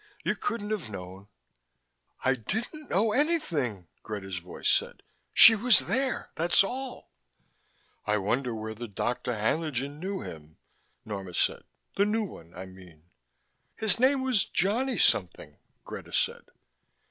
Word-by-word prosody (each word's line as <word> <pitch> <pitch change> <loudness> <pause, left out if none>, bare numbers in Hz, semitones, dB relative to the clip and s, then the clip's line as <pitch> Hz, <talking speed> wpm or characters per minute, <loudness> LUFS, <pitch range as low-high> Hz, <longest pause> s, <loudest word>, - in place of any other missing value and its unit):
You - - 0
couldn't 230 - -3
have 195 - -3
known 95 0 -9 0.5
" - - -32
"I 130 - +4
didn't 225 - -5
know 210 +4 +2
anything," 170 - 0
Greta's 95 -4 -5
voice 90 +1 -6
said. - - +1 0.3
"She 225 - +10
was 225 +2 +5
there, 260 +5 -1
that's 170 +2 +5
all." 255 +5 -6 1.0
"I 105 0 +2
wonder 120 +5 -1
whether 110 +2 -6
Dr. 120 +4 -2
Haenlingen 140 +4 -1
knew 190 +2 -4
him," 80 0 -10 0.5
Norma 95 -4 -6
said. - - 0 0.3
"The 200 - +4
new 220 +2 0
one, 85 - -10
I 95 +1 -7
mean." 90 -3 -16 0.6
"His 220 0 +2
name 260 +1 +3
was 250 -7 +3
Johnny 235 +6 0
something," 90 - +1 0.3
Greta - - -8
said. - - -1
140 Hz, 135 wpm, -28 LUFS, -, 1.0 s, She